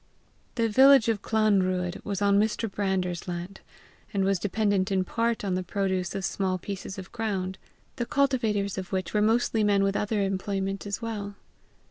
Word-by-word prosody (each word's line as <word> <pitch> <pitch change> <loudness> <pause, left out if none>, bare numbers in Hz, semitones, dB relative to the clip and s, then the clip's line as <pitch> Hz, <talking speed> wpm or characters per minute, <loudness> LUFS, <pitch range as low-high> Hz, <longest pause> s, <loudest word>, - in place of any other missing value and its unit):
The 230 -2 +2
village 265 +2 +6
of 215 -3 0
the - - -13
Clanruadh 190 -4 +1
was 205 -1 -2
on 200 0 +4
Mr. 220 +2 0
Brander's 190 -4 -2
land, 175 +2 -6 0.5
and 195 -1 0
was 195 -1 +1
dependent 200 -1 0
in 190 -1 +2
part 230 +4 -1
on 190 - 0
the 185 - 0
produce 185 -1 -2
of 195 - -2
small 190 -1 -1
pieces 190 +1 -6
of 190 -1 -8
ground, 195 -5 -3 0.4
the 240 -2 -2
cultivators 225 -9 +1
of 185 - -7
which 190 -1 -2
were 210 - +2
mostly 225 0 +2
men 200 -1 +3
with 195 0 +1
other 210 0 0
employment 195 0 -2
as 200 +3 -4
well. 205 -3 -4
200 Hz, 175 wpm, -27 LUFS, 190-215 Hz, 0.5 s, village